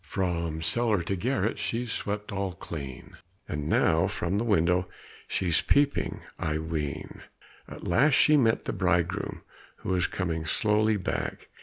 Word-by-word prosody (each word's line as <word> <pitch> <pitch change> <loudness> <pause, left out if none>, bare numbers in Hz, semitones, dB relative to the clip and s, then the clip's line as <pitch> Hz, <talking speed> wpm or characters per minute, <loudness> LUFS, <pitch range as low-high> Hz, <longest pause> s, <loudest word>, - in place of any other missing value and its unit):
"From 85 -4 -2
cellar 105 +1 +2
to 95 +4 -1
garret 110 +1 0
she's 120 0 -2
swept 105 +1 -3
all 95 -2 -2
clean, 70 -6 -8 0.3
And 75 0 -3
now - - +3
from 95 +4 -1
the - - 0
window 90 -4 +2 0.4
she's 85 -4 +1
peeping, 145 0 +1 0.2
I 75 -1 -1
ween." 80 -3 -4 0.5
At - - -8
last 135 - +4
she 155 - +6
met 115 -6 +3
the - - -2
bridegroom, 90 +1 0 0.3
who - - -7
was 90 -1 +2
coming 85 -4 -2
slowly 105 +5 +2
back. 95 - -3
95 Hz, 145 wpm, -28 LUFS, 85-110 Hz, 0.5 s, she